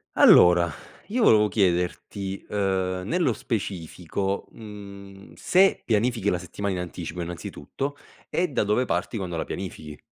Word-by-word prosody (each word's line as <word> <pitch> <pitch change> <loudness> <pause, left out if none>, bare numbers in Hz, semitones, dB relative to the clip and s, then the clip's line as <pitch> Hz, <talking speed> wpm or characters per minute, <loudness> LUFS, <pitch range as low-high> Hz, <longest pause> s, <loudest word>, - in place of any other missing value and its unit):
Allora, 85 -1 +7 0.4
io 230 +3 0
volevo 105 - +6
chiederti, 95 0 -1
uhm, 95 -2 0
nello 175 - +2
specifico, 95 -2 -3
mhmm, 100 -2 -11
se 190 +1 +3
pianifichi 110 -1 +1
la 90 - +1
settimana 95 +3 -4
in 90 - -2
anticipo, 90 -1 -6
innanzitutto, 90 - -5 0.3
e 180 - 0
da 130 - 0
dove 105 +5 +2
parti 125 - -2
quando 90 -5 -3
la - - -2
pianifichi? 80 -5 -7
100 Hz, 130 wpm, -25 LUFS, 90-110 Hz, 0.4 s, Allora